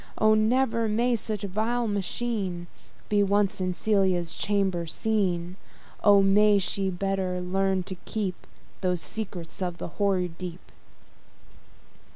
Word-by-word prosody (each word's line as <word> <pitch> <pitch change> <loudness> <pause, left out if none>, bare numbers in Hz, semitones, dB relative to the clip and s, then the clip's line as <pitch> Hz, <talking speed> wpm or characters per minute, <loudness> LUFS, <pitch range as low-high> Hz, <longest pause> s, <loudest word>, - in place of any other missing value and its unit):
O! 215 0 +5
ne'er 230 +1 +2
may 235 +3 +2
such 215 -2 -3
a - - -1
vile 225 +5 0
machine 200 -3 -2 0.4
Be 205 -1 +3
once 200 0 +1
in 185 -1 -1
Celia's 190 -5 +1
chamber 190 -4 0
seen! 185 -2 -1 0.5
O! 200 -1 +7
may 205 +1 +5
she 195 0 0
better 190 0 -1
learn 190 +1 0
to 185 - -7
keep 200 -5 -3 0.3
Those 180 -1 0
"secrets 190 -6 -6
of 175 -2 -2
the - - -5
hoary 190 -3 +2
deep." 180 0 -8
195 Hz, 130 wpm, -27 LUFS, 180-215 Hz, 0.5 s, O